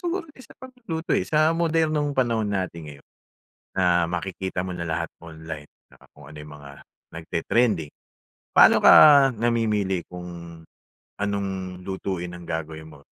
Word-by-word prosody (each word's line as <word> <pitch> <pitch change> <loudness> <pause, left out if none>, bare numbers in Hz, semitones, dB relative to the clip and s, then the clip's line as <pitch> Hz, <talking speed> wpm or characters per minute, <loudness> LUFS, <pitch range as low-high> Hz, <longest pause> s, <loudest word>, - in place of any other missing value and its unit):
siguro 355 +1 -3
sa 255 -4 -17
pagluluto 240 -11 -6
eh, - - +2
sa 155 +1 +3
modernong 160 -3 0
panahon 115 -4 0
natin 90 -5 -4
ngayon. 70 -1 -13 0.7
Na 85 -2 +2
makikita 90 +1 -4
mo 90 - -5
na 85 - -5
lahat 85 0 -2 0.2
online 80 -2 -9 0.2
na - - -23
kung - - -17
ano 75 - -13
yung 75 0 -11
mga 70 -1 -12 0.4
nagte-trending. 85 +1 -1 0.7
Paano - - +7
ka - - +8 0.4
namimili 105 -5 0
kung 90 0 -9 0.9
anong 95 -3 -4
lutuin 90 -2 -5
ang 90 - -12
gagawin 80 -1 -6
mo? 70 - -16
95 Hz, 135 wpm, -24 LUFS, 85-120 Hz, 0.9 s, ka